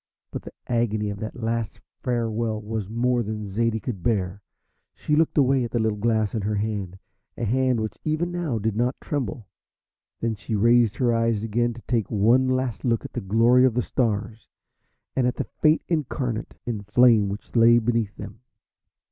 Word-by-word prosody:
But - - -5
the - - -10
agony 110 -3 0
of 100 - -7
that 110 +1 -5
last 115 -1 -2 0.2
farewell 115 -3 -1
was 105 -2 -4
more 120 +2 +1
than 105 -1 -4
Zaidie 115 +2 0
could 110 -5 -5
bear. 100 -2 -1 0.5
She 150 - 0
looked 160 +1 +2
away 135 -2 +4
at 120 - -3
the 120 - -2
little 110 -2 0
glass 110 -1 +1
in 110 - -1
her 105 +2 -1
hand, 100 -3 -3 0.4
a 120 - -2
hand 130 +2 +2
which 110 0 -4
even 160 +3 -1
now 170 -9 -2
did 110 0 -1
not 120 +3 0
tremble. 120 -7 -4 0.7
Then 115 -1 -1
she 110 +1 -4
raised 115 +1 +4
her 120 -3 +2
eyes 115 -2 +1
again 120 +2 0
to 120 - -12
take 115 -4 -1
one 115 +5 +3
last 130 -3 -1
look 115 -3 0
at - - -8
the - - -3
glory 115 +6 +4
of 130 -3 +3
the 125 - +1
stars, 110 -2 -2 0.7
and 125 -2 +2
at 125 - -1
the - - -2 0.2
Fate 155 +1 +4
Incarnate 130 -7 -2
in 115 -4 -3
Flame 105 0 +4
which 100 +5 -8
lay 120 0 +6
beneath 115 -3 0
them. - - -9
115 Hz, 185 wpm, -24 LUFS, 105-125 Hz, 0.7 s, lay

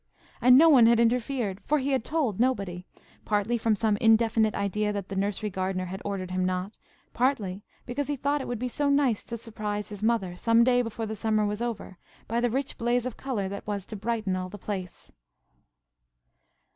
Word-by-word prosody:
And 250 +1 +7
no 325 +4 +7
one 260 -7 +7
had 235 0 +5
interfered; 235 -3 0
for 300 - +2
he 280 0 -1
had 265 -4 +1
told 265 - -1
nobody, 200 -8 -1 0.4
partly 210 +2 0
from 225 -1 +2
some 210 0 +1
indefinite 225 -1 +3
idea 210 +1 -1
that 200 -2 -5
the 195 - -5
nursery 205 +2 -1
gardener 185 0 -2
had 190 +2 -6
ordered 190 -3 -4
him 185 0 0
not; 185 +3 -2 0.4
partly 220 -7 0 0.2
because 275 +3 -3
he 290 - -1
thought 285 +2 0
it - - -6
would 245 - -3
be 250 +3 -2
so 285 +3 -1
nice 280 -6 +2
to 235 - -5
surprise 210 -2 -4
his 205 -1 -8
mother, 215 -5 0
some 230 +5 +4
day 245 0 +4
before 225 -1 -4
the 220 0 -4
summer 215 0 +1
was 210 +2 -3
over, 230 -6 -5 0.3
by 230 +1 0
the 245 - +2
rich 270 +4 -3
blaze 240 +1 +1
of 255 - -4
colour 235 -8 -3
that 200 +1 -7
was 200 -2 -3
to 220 - -8
brighten 215 -2 -2
all 185 0 -4
the 205 - -9
place. 190 -3 -6
220 Hz, 200 wpm, -27 LUFS, 200-245 Hz, 0.4 s, And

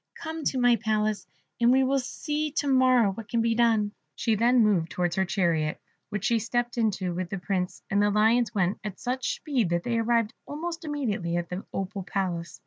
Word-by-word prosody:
Come 320 -1 -6
to 265 - 0
my 245 -1 +4
palace, 215 -1 -1 0.3
and 235 +1 +5
we 265 +1 +4
will 270 +1 +2
see 300 +4 -3
to 295 -2 -1
morrow 255 -5 +4
what 210 +2 -9
can 235 - 0
be 230 0 +2
done." 225 -3 +2 0.2
She 225 - 0
then 235 +3 +4
moved 185 -6 +2
towards 175 -1 -1
her 190 - +1
chariot, 170 -5 0 0.3
which 210 -1 -3
she 235 -2 +3
stepped 240 +2 -1
into 205 -6 0
with 180 0 -3
the 195 - -3
Prince, 180 -1 -3
and 200 +1 +1
the 205 - +3
Lions 225 +3 +3
went 190 -3 0
at 205 -3 -6
such 255 +1 -2
speed 260 - -1
that 170 0 0
they 235 -1 0
arrived 230 0 +1
almost 330 +3 -5
immediately 215 - -2
at 175 -1 -3
the 180 +2 -6
Opal 195 +1 -4
Palace. 180 -3 -3
220 Hz, 205 wpm, -27 LUFS, 190-245 Hz, 0.3 s, and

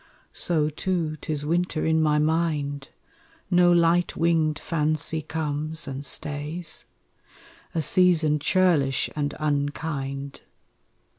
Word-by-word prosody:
So 155 -4 +1
too 165 -1 -2
'tis 145 0 -3
winter 170 0 0
in 160 0 +2
my 150 -1 +2
mind, 150 -3 -1 0.6
No 175 0 +5
light 170 0 +3
winged 160 -2 +2
fancy 155 0 0
comes 155 0 -3
and 135 +1 -5
stays: 150 +4 -5 0.9
A 160 - +1
season 165 -5 +4
churlish 150 -5 +2
and 145 -1 -2
unkind. 140 -2 -3
155 Hz, 100 wpm, -25 LUFS, 145-165 Hz, 0.9 s, No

